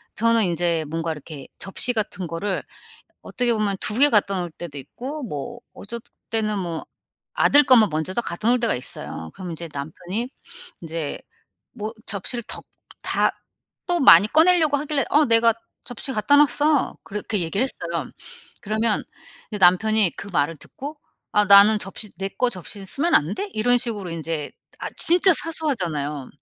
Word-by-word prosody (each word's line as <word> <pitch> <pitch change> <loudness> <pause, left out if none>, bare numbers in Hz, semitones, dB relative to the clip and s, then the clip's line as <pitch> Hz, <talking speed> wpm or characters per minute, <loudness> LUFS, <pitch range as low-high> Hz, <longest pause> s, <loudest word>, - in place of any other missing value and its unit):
저는 230 0 +3
인제 170 -2 0
뭔가 165 0 -2
이렇게 150 -2 -9
접시 215 +5 +1
같은 205 -5 -3
거를 185 +4 -3 0.6
어떻게 245 -2 0
보면 210 -3 0
2 210 +3 +3
개 290 +1 +8
갖다 200 -2 +3
놓을 175 -1 -4
때도 155 -3 -8
있고 270 - -7
뭐 235 +7 -6
어쩔 235 +4 -7 0.3
때는 215 -2 0
뭐 170 -3 -4 0.5
아들 290 +1 +6
것만 235 -6 +6
먼저 160 +4 -2
딱 240 - 0
갖다 210 +3 -3
놓을 250 +1 +4
때가 235 - +1
있어요. 80 -9 -6
그럼 180 -3 -7
이제 165 +1 -7
남편이 175 - -5 0.5
인제 165 -3 -4 0.6
뭐 215 -1 -5
접시를 225 +4 -3
더 - - -3 0.4
다 - - +2 0.6
또 350 -1 +1
많이 205 - +8
꺼내려고 320 0 +4
하길래 295 0 -1
"어 300 +1 +4
내가 230 0 +5 0.3
접시 245 +2 -4
갖다 255 +6 +3
놨어." 295 +1 +3
그렇게 210 0 -3
얘기를 180 +9 -1
했어요. 170 -7 -5 0.5
그러면 215 +1 0 0.6
남편이 190 +2 +4
그 200 - -7
말을 150 0 0
듣고 290 +3 -9 0.3
"아 210 0 +4
나는 200 +2 +8
접시 205 +2 -6
내 195 0 -2
거 250 +5 0
접시는 195 +1 -7
쓰면 320 - 0
안 160 +7 +3
돼?" 400 - -3
이런 245 +3 +3
식으로 210 -6 -3
인제 160 -2 -4 0.3
아 - - -3
진짜 360 +3 +4
사소하잖아요. 170 - -3
210 Hz, 305 characters per minute, -23 LUFS, 170-245 Hz, 0.6 s, 개